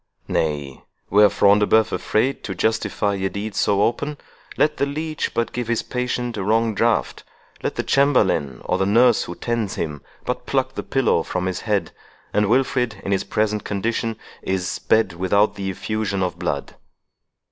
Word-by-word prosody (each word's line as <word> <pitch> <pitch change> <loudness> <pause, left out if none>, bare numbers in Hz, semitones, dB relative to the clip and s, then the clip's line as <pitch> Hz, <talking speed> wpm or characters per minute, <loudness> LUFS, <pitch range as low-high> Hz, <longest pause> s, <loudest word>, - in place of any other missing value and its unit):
Nay, 75 -4 -2 0.3
were 105 +1 +7
Front 100 +1 +4
de 105 - +2
Bœuf 110 0 +4
afraid 125 +6 0
to 95 - -4
justify 105 0 0
a 95 0 -1
deed 105 +2 -5
so 100 0 +2
open, 145 +6 -1 0.4
let 150 0 +2
the 140 - +1
leech 155 +1 -3
but 115 0 0
give 120 -2 -3
his 115 -1 0
patient 125 -2 -2
a 100 - -2
wrong 110 +2 +2
draught—let 115 +3 -2
the - - -1
chamberlain, 105 - +2
or 90 - 0
the 95 - +2
nurse 120 +2 +4
who 85 - -7
tends 115 -2 -2
him, 75 -3 -4 0.2
but 125 - -3
pluck 130 -1 0
the - - -4
pillow 130 -10 +1
from 90 +2 -3
his 95 -1 -2
head, 105 -3 -1 0.4
and 105 -1 +2
Wilfred 125 -3 +1
in 100 - -2
his 95 - +1
present 105 -1 0
condition, 115 +2 -2 0.2
is 95 -2 -1
sped 110 -5 +1
without 100 +4 +2
the 100 -1 -4
effusion 100 0 -2
of 90 - -3
blood. 70 -1 -3
105 Hz, 170 wpm, -22 LUFS, 95-120 Hz, 0.4 s, were